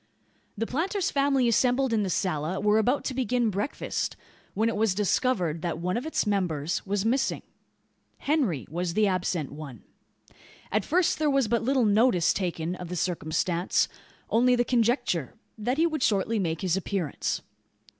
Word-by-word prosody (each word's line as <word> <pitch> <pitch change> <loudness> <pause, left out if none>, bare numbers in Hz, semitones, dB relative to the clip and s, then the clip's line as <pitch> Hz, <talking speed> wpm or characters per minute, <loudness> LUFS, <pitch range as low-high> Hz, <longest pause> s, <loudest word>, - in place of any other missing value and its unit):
The 225 - -1
planter's 360 - -1
family 275 -3 +2
assembled 250 +2 +2
in 220 - +2
the 195 - -1
sala 170 0 -1
were 210 +1 +3
about 250 +6 +1
to 265 - -3
begin 245 -2 +1
breakfast, 205 +8 -3 0.4
when 220 +3 +2
it 230 - 0
was 215 -3 +1
discovered 190 -5 0
that 170 -2 -2
one 180 +2 -2
of 245 +6 -2
its 320 - 0
members 175 -7 -1
was 200 +1 -1
missing. 260 +4 0 0.7
Henry 265 - 0
was 170 +2 -3
the 215 - +4
absent 180 -6 -1
one. 140 -6 -9 0.9
At 210 0 +1
first 345 0 +2
there 305 -1 +2
was 275 -4 +2
but 235 +1 +1
little 260 0 +2
notice 210 -4 +3
taken 175 -3 -2
of 180 - -7
the 180 - -4
circumstance. 175 +1 0 0.4
Only 250 +2 +3
the 240 0 +1
conjecture: 235 - +1 0.2
that 240 +5 -2
he 325 - +4
would 310 -4 -1
shortly 215 0 +1
make 165 -4 -2
his 185 -2 +1
appearance. 190 -5 -2
210 Hz, 165 wpm, -27 LUFS, 180-250 Hz, 0.9 s, the